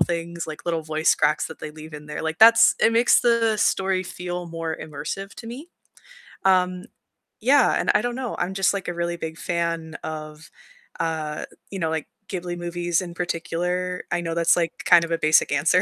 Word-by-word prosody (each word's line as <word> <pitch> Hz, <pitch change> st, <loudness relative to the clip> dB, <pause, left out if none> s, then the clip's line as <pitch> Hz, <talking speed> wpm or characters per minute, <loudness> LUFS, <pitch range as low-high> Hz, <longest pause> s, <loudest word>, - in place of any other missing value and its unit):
things, 170 Hz, 0 st, -2 dB
like 155 Hz, -, -8 dB
little 165 Hz, -2 st, -1 dB
voice 155 Hz, 0 st, +2 dB
cracks 150 Hz, +1 st, +1 dB
that 160 Hz, -, -11 dB
they 155 Hz, -, -6 dB
leave 155 Hz, 0 st, -11 dB
in 150 Hz, 0 st, -9 dB
there. 150 Hz, -, -5 dB
Like, 160 Hz, +2 st, -3 dB
that's 230 Hz, +1 st, +8 dB
it 225 Hz, -, +4 dB
makes 235 Hz, +1 st, +5 dB
the 230 Hz, -2 st, +2 dB
story 190 Hz, -2 st, +1 dB
feel 180 Hz, -1 st, -5 dB
more 165 Hz, -1 st, -4 dB
immersive 160 Hz, +6 st, -6 dB
to 230 Hz, -, -9 dB
me. 270 Hz, +9 st, -8 dB, 0.8 s
Um, 185 Hz, 0 st, +2 dB, 0.5 s
yeah, 265 Hz, +6 st, +4 dB
and -, -, -1 dB
I 210 Hz, -, +4 dB
don't 245 Hz, 0 st, -2 dB
know. 255 Hz, -3 st, -4 dB
I'm 190 Hz, -, -1 dB
just, 195 Hz, +1 st, +2 dB
like, 195 Hz, -3 st, -4 dB
a 175 Hz, -, -3 dB
really 170 Hz, 0 st, -2 dB
big 160 Hz, 0 st, -6 dB
fan 165 Hz, -2 st, -2 dB
of, 155 Hz, 0 st, -7 dB, 0.5 s
uh, 160 Hz, -2 st, -2 dB, 0.3 s
you 195 Hz, -, -5 dB
know, 160 Hz, -, 0 dB
like, 160 Hz, -2 st, -3 dB, 0.2 s
Ghibli 175 Hz, -2 st, -4 dB
movies 175 Hz, 0 st, -1 dB
in 175 Hz, -2 st, -7 dB
particular. 180 Hz, +1 st, -2 dB
I 175 Hz, 0 st, 0 dB
know 165 Hz, -1 st, -3 dB
that's, 170 Hz, 0 st, +4 dB
like, 170 Hz, -2 st, -2 dB
kind 175 Hz, -2 st, +7 dB
of 170 Hz, -, -9 dB
a 165 Hz, -, +2 dB
basic 155 Hz, -1 st, +3 dB
answer, 155 Hz, +6 st, +3 dB
170 Hz, 195 wpm, -24 LUFS, 160-185 Hz, 0.8 s, that's